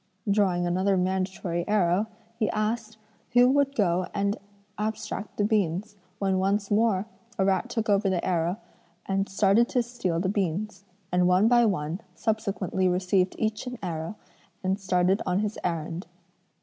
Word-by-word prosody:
Drawing 195 -4 +2
another 185 +3 +2
mandatory 185 -2 -1
arrow, 200 0 +2 0.3
he 215 - +1
asked 220 0 -2 0.4
who 245 0 +7
would 280 0 +2
go 180 -4 +1
and 200 0 +1 0.4
abstract 215 -1 -4
the 205 - +2
beans, 205 -1 0 0.2
when 190 -2 +1
once 200 +1 0
more 210 -2 +3 0.3
a 190 - +2
rat 195 +5 +1
took 225 -2 -2
over 200 -1 +3
the 180 -2 0
arrow 175 +1 0 0.5
and 195 0 -1
started 200 +4 +3
to 250 -2 +1
steal 225 -8 -2
the 185 - 0
beans; 200 +1 -2 0.3
and 180 0 +3
one 185 +4 +4
by 240 -1 +5
one 170 -2 -2
subsequently 195 -3 -1
received 185 +1 +1
each 220 +3 -2
an 250 0 -5
arrow 165 +2 -4 0.5
and 190 +1 0
started 185 0 +2
on 180 +2 +1
his 210 0 -3
errand. 170 0 -3
195 Hz, 150 wpm, -27 LUFS, 180-215 Hz, 0.5 s, who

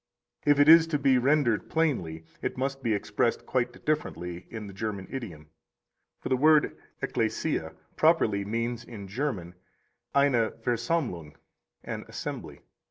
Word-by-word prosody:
If 145 -1 +5
it 145 - +6
is 165 +1 +9
to 160 -2 0
be 135 -2 +4
rendered 130 -4 +2
plainly, 90 - -1 0.2
it - - -3
must 135 +1 -2
be 115 - 0
expressed 105 +3 -1
quite 125 -1 -2
differently 90 - -2
in 110 -2 -6
the 100 - -9
German 100 -2 -4
idiom; 85 - -7 0.7
for - - -5
the 130 - +3
word 155 +2 +4 0.3
ecclesia - - -1 0.2
properly 135 -11 +3
means 115 +3 -2
in 105 -5 -9
German 100 - -3 0.6
eine 135 -5 +4
Versammlung, 115 - -1 0.5
an - - -5
assembly. - - -6
120 Hz, 135 wpm, -28 LUFS, 100-145 Hz, 0.7 s, is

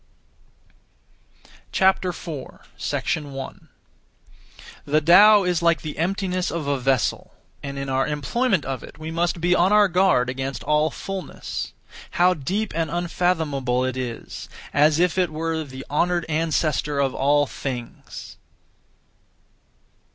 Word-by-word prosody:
4. 180 -6 0 0.6
1. 135 -2 -8 1.1
The 150 +2 +2
Tao 205 +6 +7
is 180 -2 0
(like) 170 -1 +3
the 155 -1 -6
emptiness 185 +1 -1
of 165 -3 -3
a 140 -1 0
vessel; 130 -2 0 0.3
and 140 -1 -6
in 140 0 -4
our 135 0 +1
employment 170 - 0
of 130 -3 -3
it - - -12
we 155 +1 -6
must 170 +1 0
be 175 +2 +2
on 180 +2 +3
our 210 -1 +6
guard 180 -9 +3
against 130 +1 -4
all 150 +1 +2
fulness. 195 +5 -6 0.4
How 180 +1 +5
deep 190 +8 -2
and 165 -1 0
unfathomable 160 -7 0
it 130 -1 -2
is, 125 -3 -6 0.2
as 150 +1 +4
if 180 +1 +2
it 180 -2 +2
were 160 +1 -2
the 135 -2 -9
Honoured 175 +3 +1
Ancestor 155 -3 0
of 135 -2 +1
all 145 +2 +3
things! 125 -4 -7
155 Hz, 125 wpm, -23 LUFS, 140-180 Hz, 1.1 s, Tao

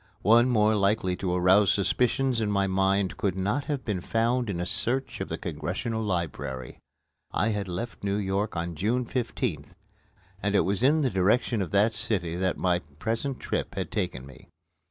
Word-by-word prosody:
One 120 +3 +5
more 110 -2 +4
likely 100 -2 +1
to 90 -2 -1
arouse 95 +3 +5
suspicions 125 +4 +1
in 105 - 0
my 100 -1 +2
mind 95 0 +1
could 95 -3 0
not 105 +10 -1
have 145 -3 -3
been 100 -5 -2
found 115 +4 0
in 90 -4 -2
a 90 - -1
search 130 +8 -1
of - - -3
the - - -3
Congressional 90 - -3
Library. 80 - -3 0.5
I 115 - +1
had 105 -2 -2
left 100 +7 -5
New 100 0 0
York 100 0 -1
on 85 +1 -2
June 115 +9 0
15th, 120 -1 -3 0.7
and 100 0 0
it - - +5
was 100 +3 0
in 150 +5 +4
the 130 -4 +1
direction 105 +4 +2
of 90 - -2
that 105 +5 +3
city 105 -8 -2
that 95 0 0
my 90 -1 +1 0.2
present 115 - -2
trip - - -3
had - - -3
taken 65 - -2
me. 65 -2 -15
100 Hz, 180 wpm, -27 LUFS, 90-115 Hz, 0.7 s, One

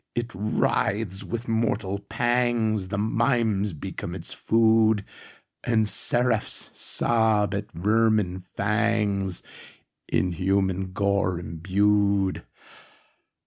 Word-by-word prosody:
—it 120 0 -2
writhes!—with 105 +2 -1
mortal 110 -3 0
pangsThe 110 -2 0
mimes 110 -2 +1
become 75 - -6
its - - -6
food, 110 -2 +3 0.6
And 110 -3 +2
seraphs 115 +2 0
sob 110 -3 +1
at 100 +1 -4
vermin 105 -1 +1 0.2
fangsIn 100 -3 -2
human 95 +1 0
gore 100 -3 +1
imbued. 100 +3 +1
105 Hz, 75 wpm, -25 LUFS, 95-115 Hz, 0.6 s, food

